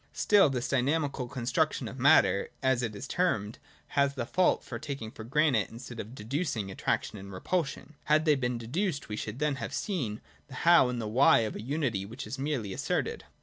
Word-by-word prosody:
Still 205 -7 +5
this 125 -3 -2
dynamical 140 -1 0
construction 120 -1 -1
of - - -8
matter, - - +4
as 130 -2 +2
it 110 -3 -3
is 100 - -7
termed, 110 - 0 0.3
has 140 0 +1
the 120 - -2
fault 185 +8 +1
of 115 0 -4
taking 140 -7 -5
for 110 - -9
granted, 130 -3 +2
instead 120 0 -9
of 110 +5 -7
deducing, 115 - -2
attraction 105 +2 -2
and 100 +1 -10
repulsion. 155 - -3
Had 155 +1 +3
they 155 - +5
been 125 -3 -1
deduced, 145 - -2
we 105 - -3
should 105 +1 -5
then 150 -1 0
have - - -5
seen 130 - -2 0.3
the 130 - -11
How 170 -7 +7
and 125 -1 -3
the 110 - -3
Why 130 +6 +5
of 110 -1 -3
a - - -5
unity 130 -5 -1
which 105 +4 -7
is 120 +6 -6
merely 135 -9 -2
asserted. - - -2
125 Hz, 195 wpm, -29 LUFS, 110-150 Hz, 0.3 s, How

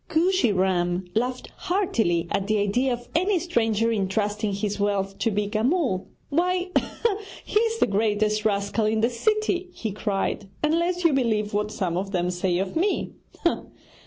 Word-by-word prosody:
Kooshy 345 - +3
Ram 180 -1 +1
laughed 250 +4 -1
heartily 225 - 0
at 195 - 0
the 215 0 +2
idea 210 +6 +1
of 240 0 -4
any 370 +4 +2
stranger 230 - +1
entrusting 210 +1 0
his 200 +1 -2
wealth 195 -1 0
to 230 - +2
Beeka 210 +1 -1
Mull. 260 - +1 0.2
'Why, 360 +4 +1 0.8
he 420 - +2
is 455 0 +1
the - - +4
greatest 215 +1 +1
rascal 205 +1 +1
in 220 0 +1
the 230 +2 +2
city,' 380 - 0
he 225 -10 -4
cried, 200 -1 -2
'unless 340 +3 +1
you 335 -3 +4
believe 220 -6 +1
what 210 +1 0
some 180 -5 -2
of 195 +2 -3
them 180 0 +1
say 180 0 0
of 190 +1 -2
me! 375 +5 0
215 Hz, 160 wpm, -25 LUFS, 200-315 Hz, 0.8 s, the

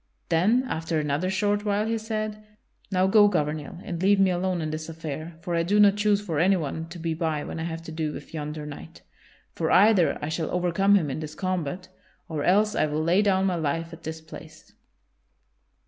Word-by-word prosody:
Then 200 +10 +3
after 160 -5 -2
another 150 +4 -1
short 205 +2 0
while 205 0 0
he 225 0 -1
said: 215 -1 -4 0.5
"Now 185 -1 +2
go, 205 +2 +6
Gouvernail, 155 -1 -2
and 170 -2 -5
leave 200 +1 +4
me 190 -1 +4
alone 180 0 -1
in 155 -1 -3
this 155 +1 -5
affair, 160 0 -6
for 175 0 -4
I 170 - +2
do 200 +5 +2
not 205 -1 +6
choose 210 -1 +2
for 170 -8 -3
anyone 165 -3 +1
to 175 - -9
be 165 -1 -2
by 160 -2 -2
when - - -6
I 160 - -3
have 165 -1 -5
to 165 - -8
do 155 -1 -2
with - - -10
yonder 150 -1 -5
knight. 145 - -10 0.5
For - - -1
either 195 -7 +5
I 145 - -4
shall 155 +1 -2
overcome 180 +3 +2
him 160 -8 +1
in 135 - -4
this 155 -1 -7
combat 185 -2 -3 0.4
or 155 -3 -3
else 210 +5 +3
I - - +1
will 150 +1 -1
lay 175 +5 +3
down 195 -2 +2
my 185 -2 +1
life 165 +2 -2
at 165 - -11
this 160 0 -6
place. 160 0 -13
170 Hz, 210 wpm, -26 LUFS, 155-195 Hz, 0.5 s, go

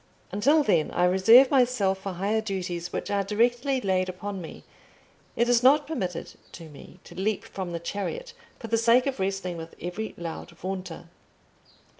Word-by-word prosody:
Until 280 - +3
then 170 - +2
I 180 - +1
reserve 225 +9 +6
myself 245 -8 +2
for 195 0 -5
higher 200 +5 0
duties 180 -4 -4
which - - -4
are 200 -1 +1
directly 240 +6 +1
laid 185 -2 0
upon 195 +1 -6
me: 165 - -10 0.7
it 235 - +2
is 240 -1 +4
not 275 +4 +5
permitted 190 - -4 0.2
to 165 -2 -10
me 150 +5 -14
to - - -13
leap 195 +3 -1
from 185 -3 -6
the 170 - -3
chariot 465 - -5 0.2
for - - -9
the 225 0 +1
sake 235 +2 +4
of 270 -5 -3
wrestling 190 -2 -2
with 165 0 -9
every 185 +6 -5
loud 170 0 -6
vaunter. 185 -3 -6
195 Hz, 170 wpm, -26 LUFS, 180-235 Hz, 0.7 s, reserve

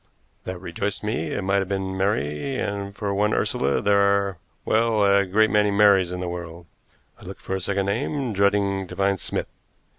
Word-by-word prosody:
That 95 0 -5
rejoiced 95 +4 -4
me; 80 -7 -2
it 100 - -2
might 100 +1 +2
have 95 -1 -3
been 95 -1 -2
Mary, 95 - -1
and 100 -1 -4
for 100 -1 -2
one 105 +2 +1
Ursula 70 +1 0
there 100 0 +4
are 100 -2 +2 0.3
well, 110 -2 +2
a 100 -1 +3
great 110 +4 +3
many 105 -1 +3
Marys 100 -3 +4
in 90 0 -4
the 90 - -3
world. 85 -1 -7 0.6
I - - -14
looked - - -9
for - - -5
a 95 - -3
second 100 +1 -1
name, 125 +4 -2
dreading 100 -1 +1
to - - -9
find 100 -1 +1
Smith. - - -3
100 Hz, 190 wpm, -23 LUFS, 95-105 Hz, 0.6 s, there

